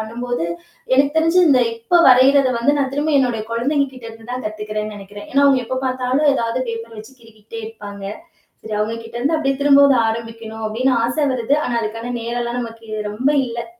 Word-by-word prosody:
பண்ணம்போது, 235 -2 -3 0.5
எனக்கு 280 +3 +3
தெரிஞ்சு, 330 +3 +3
இந்த 255 -3 +5
இப்ப 230 +10 +2
வரையுறத 260 +1 +5
வந்து 285 +5 +2
நான் 270 -1 -1
திரும்ப 300 +2 0
என்னோட 245 -4 0
கொழந்தைகள் 275 +3 0
கிட்ட 245 -2 -10
இருந்து 225 +2 -12
தான் 250 -1 -5
கத்துகிறேன்னு 215 0 -5
நெனைக்கிறன். 205 +1 -11
ஏன்னா, 280 +1 +3
அவங்க 270 -2 +4
எப்ப 260 +2 -3
பாத்தாலும் 255 +3 +1
ஏதாவது 230 0 -1
பேப்பர 230 0 -6
வைச்சு 220 +5 -12
கிறுக்கிட்டே 225 0 -11
இருப்பாங்க. 205 -3 -9 0.6
சரி, 220 -1 -6
அவங்ககிட்ட 230 +2 -4
இருந்து 285 +7 +1
அப்டியே 275 -3 0
திரும்பவும் 280 0 +6
அத 230 - +3
ஆரம்பிக்கணும் 225 -1 -7
அப்டின்னு 255 +4 +1
ஆச 240 +1 -2 0.2
வருது. 255 +3 +1
ஆனா, 245 - -2
அதுக்கான 225 +3 -4
நேரம் 235 +1 -3
எல்லாம் 240 +1 -3
நமக்கு 230 -1 -8 0.2
ரொம்ப 245 +6 -1 0.2
இல்ல. 235 0 -5
235 Hz, 185 wpm, -19 LUFS, 225-265 Hz, 0.6 s, திரும்பவும்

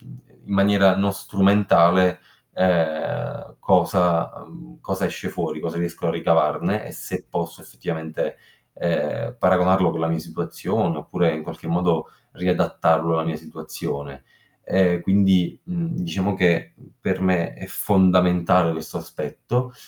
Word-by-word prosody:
uhm, - - -15 0.3
in 100 - -3
maniera 100 -1 +4
non 100 0 +1
strumentale, 95 -3 +3 0.3
ehm, 85 -4 -1
cosa 85 -2 +2
mhmm, 165 -1 -15
cosa 95 -1 -2
esce - - -5
fuori, 75 - -4
cosa 85 +1 -4
riesco 85 -1 -3
a - - +2
ricavarne, - - +1
e - - -9
se - - -7
posso 85 0 -4
effettivamente, 80 -1 -5 0.4
ehm, - - -2
paragonarlo 90 -1 +4
con 80 - -4
la 80 - +1
mia 80 0 0
situazione, 80 0 -2
oppure 85 -3 0
in 80 - -5
qualche 80 0 -9
modo 85 -1 0 0.2
riadattarlo 85 -2 +1
alla 80 0 0
mia 80 -1 -2
situazione. 70 -3 -7 0.4
Ehm, 90 -2 +2
quindi, 95 -2 +2
mhmm, 170 -2 -4
diciamo 100 - -1
che, 85 -3 +1
uhm, - - -21
per - - -1
me 90 -3 +1
è - - -10
fondamentale 90 -3 +3
questo 80 -1 -6
aspetto, 125 +1 -4
90 Hz, 135 wpm, -22 LUFS, 80-95 Hz, 0.4 s, maniera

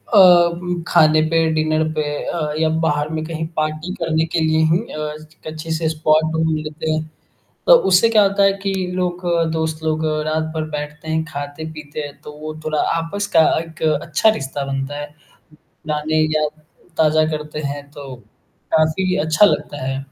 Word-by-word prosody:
उम, 175 -2 +5
खाने 155 -2 +5
पे 165 0 +2
डिनर 155 0 +1
पे 155 -1 -1 0.2
अ, 155 -3 -2
या 160 0 +2
बाहर 150 -2 0
में 155 0 -3
कहीं 160 0 -4
पार्टी 155 +3 -2
करने 160 -1 0
के 170 - +2
लिए 160 0 +2
ही 170 - +4
अ, 150 0 -4
स 155 - -14
एक 160 - -15
अच्छे 160 +1 -6
से 160 0 0
स्पॉट 155 0 +2
ढूँढ 160 0 +1
लेते 155 +1 -4
हैं। 155 0 -2 0.6
तो - - +9 0.2
उससे 190 +5 +5
क्या 215 -2 +5
होता 200 0 +2
है 195 0 +5
कि 195 - 0 0.2
लोग 180 -1 -2 0.3
दोस्त 160 -1 -2
लोग 155 0 0 0.2
रात 155 +1 0
भर 160 -1 -2
बैठते 150 +1 -6
हैं, 160 0 0
खाते-पीते 155 0 -7
हैं 145 -1 -8
तो 150 - -9
वो 155 0 -6
थोड़ा 155 -1 0
आपस 200 +5 -2
का 160 - +8 0.2
एक 165 0 -10 0.2
अच्छा 170 +6 +2
रिश्ता 140 -7 -3
बनता 135 +1 -3
है। 145 - -4 0.5
पुरानी 155 0 -2
यादें 155 0 -2 0.3
ताज़ा 155 0 +4
करते 150 0 -5
हैं 145 0 -6
तो 140 -3 -9 0.6
काफ़ी 160 +4 +2
अच्छा 160 +6 +5
लगता 145 -8 -1
है। 135 0 -2
155 Hz, 175 wpm, -19 LUFS, 150-165 Hz, 0.6 s, तो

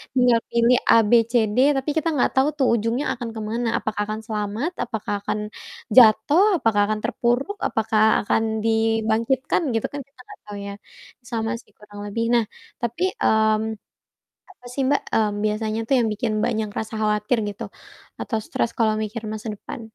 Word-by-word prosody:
tinggal 245 -2 +4
pilih 235 +1 +3 0.2
A,B,C,D, 230 0 +3 0.2
tapi 270 +3 -2
kita 320 +1 0
nggak 255 - +2
tau 265 +2 +4
tuh 265 -3 +2
ujungnya 235 +5 0
akan 235 -1 -4
kemana, 225 +2 -3
apakah 215 -1 -3
akan 215 0 -4
selamat, 215 - -2
apakah 220 -3 -4
akan - - -21
akan 210 - -2 0.6
jatuh, 245 - +6 0.2
apakah 210 -2 +2
akan 215 0 -1
terpuruk, 260 +11 -1
apakah 220 -1 +1 0.2
akan 220 +2 +1 0.2
dibangkitkan, 225 +5 +1
gitu 225 - 0
kan, 285 - -5
kita 275 - -39
nggak - - -13
tau 205 - -7
ya, 200 - -5 0.6
sama 225 -1 -1
sih - - -29
kurang 210 -1 -13
lebih. 230 +3 -2
Nah, 235 -1 +4 0.4
tapi, 235 +8 -2 0.2
mmm, 220 0 +2 0.8
apa 250 -10 -22
sih 275 - -2
Mbak, 285 - +2
mmm, 215 -2 +2
biasanya 215 +1 -1
tuh 270 - +3
yang 230 - +1
bikin 220 +1 -2
banyak 220 -3 -1
rasa 220 0 -6
khawatir 210 +3 +1
gitu, 200 - -7 0.6
atau 225 - -2
stres 235 - -1
kalau 220 -2 +2
mikir 215 +1 -5
masa 215 +1 -6
depan? 230 - -9
225 Hz, 165 wpm, -23 LUFS, 215-240 Hz, 0.8 s, jatuh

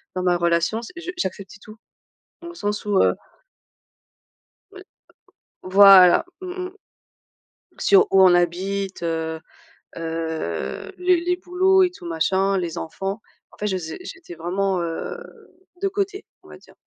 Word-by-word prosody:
dans 185 - -2
ma 180 -1 +2
relation, 170 +5 0
c 235 - -10
je 340 +1 -6
j'acceptais 200 - -5
tout. 215 +2 -13 0.7
Dans 340 - -8
le 345 - -10
sens 210 -8 -3
où 205 -2 +2
heu - - +3 1.6
oui. 390 -1 -12 0.8
Voilà, 190 - +7 0.2
mmh 365 0 -5
mh. 365 - -8 1.1
Sur 400 +1 +5
où 190 - +6
on 185 -1 +7
habite, 185 +2 -1
heu 160 -1 -2 0.6
heu, 160 - -4
les 360 -1 +2
les 355 +1 0
boulots 375 +2 +3
et 360 - +1
tout 270 - -14
machin, 190 +4 0
les 175 -3 -4
enfants, 195 +6 -5 0.3
en - - -19
fait 210 - -3
je 190 - -1
faisais 165 -3 -5
j'étais 365 - -10
vraiment, 185 +3 -1
heu, 165 -1 -4 0.6
de 395 - +1
côté, 395 +1 -3 0.2
on - - -18
va - - -12
dire. - - -21
195 Hz, 150 wpm, -22 LUFS, -, 1.6 s, Voilà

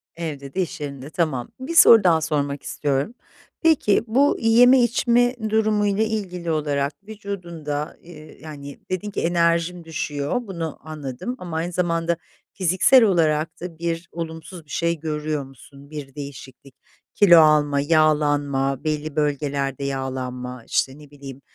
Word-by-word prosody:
Evde 145 -5 -6
de 190 - 0
iş 165 -3 -5
yerinde. 140 -1 -6
Tamam. 155 -7 -2
1 280 +6 -5
soru 230 -9 +8
daha 165 -3 +4
sormak 145 -2 -2
istiyorum. 140 - -2 0.5
Peki, 315 - +3
bu 270 +6 +3
yeme 245 +3 +6
içme 245 +1 +2
durumuyla 210 -1 +2
ilgili 185 -6 -3
olarak 145 -2 -1
vücudunda, 170 -8 -5
ııı, 155 -3 -13
yani, 145 -2 -9
dedin 185 +3 -3
ki, - - -3
"enerjim 170 0 +1
düşüyor." 150 - -3
Bunu 165 -5 -5
anladım 155 - -6
ama 170 -3 -5
aynı 170 +2 -2
zamanda 170 -1 0 0.4
fiziksel 190 +8 +4
olarak 160 -5 +1
da 170 -2 -7
bir 170 0 -3
olumsuz 165 +1 -7
bir - - -28
şey 170 +2 -1
görüyor 150 -2 -3
musun? 140 +2 -16
Bir 145 -3 -8
değişiklik, 140 -2 -10 0.4
kilo 175 -5 +7
alma, 150 -2 +4
yağlanma, 145 -3 +1
belli 155 -1 -3
bölgelerde 140 -2 -1
yağlanma, 130 -2 -4
işte, 135 +1 0
ne 150 - -15
bileyim, 140 -2 -11
155 Hz, 135 wpm, -22 LUFS, 145-180 Hz, 0.5 s, soru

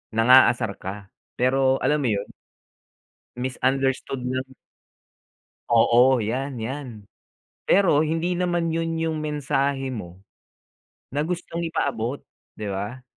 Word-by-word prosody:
nang-aasar 115 -3 +5
ka, 95 +1 -7 0.3
pero 130 +1 +2
alam 150 0 +2
mo 140 - 0
yun 100 0 -4 1.1
misunderstood 130 +1 -1
lang. 130 +1 -3 1.2
Oo, 120 +3 +5
'yan, 125 +4 -3
'yan. 115 -3 -6 0.6
Pero 180 -7 +4
hindi 165 +3 0
naman 175 -2 0
yun 165 0 -1
yung 160 -1 -1
mensahe 140 -3 -1
mo 95 -4 -8 0.8
na 145 +3 -2
gustong 170 0 -4
ipaabot, 135 -5 -2 0.3
'di 105 -1 -6
ba? 105 +6 -5
130 Hz, 105 wpm, -24 LUFS, 120-150 Hz, 1.2 s, nang-aasar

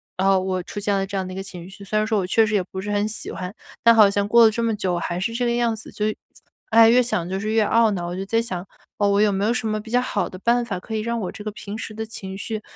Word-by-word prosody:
啊 190 0 +3
我 185 -1 -2
出 205 - -6
现 205 0 0
了 195 0 0
这 195 0 -4
样 190 -1 -2
的 185 - -7
一 - - -8
个 195 - -4
情 180 -2 -9
绪。 195 +1 -12
虽 205 +2 -2
然 215 - 0
说 220 -1 +1
我 185 - -1
确 220 +5 +3
实 210 - -2
也 200 -3 +2
不 190 +1 -8
是 205 - -6
很 205 0 +1
喜 215 - -5
欢， 180 +1 -5 0.3
但 230 - +7
好 215 -3 +7
像 200 0 0
过 235 +1 +7
了 220 - +5
这 235 +2 -2
么 230 -1 +1
久， 185 -3 -1
我 175 - -1
还 175 +1 -3
是 210 +5 -2
这 245 +1 -1
个 240 - +1
样 235 -1 +1
子， 220 - -10
就 210 - -2 0.6
唉， 225 -5 +7
越 250 +2 +5
想 180 -8 -2
就 190 - -2
是 215 +2 -2
越 220 -1 +3
懊 225 +1 +4
恼。 175 -3 -3
我 175 - -4
就 190 +1 -4
在 225 +3 +1
想， 185 -6 -5 0.3
哦 205 - +2
我 200 +1 +3
有 210 -1 +4
没 195 +1 0
有 230 - +2
什 245 -2 -2
么 215 0 -1
比 220 +1 -10
较 245 +1 +3
好 205 -7 -1
的 185 - -10
办 235 +3 +2
法 200 -6 -4
可 220 +4 -6
以 215 - -1
让 235 +1 -2
我 185 - -3
这 210 - -10
个 215 - -4
平 205 0 -7
时 225 - -6
的 220 +1 -4
情 195 -3 -7
绪， 215 +1 -4
210 Hz, 360 characters per minute, -23 LUFS, 190-225 Hz, 0.6 s, 但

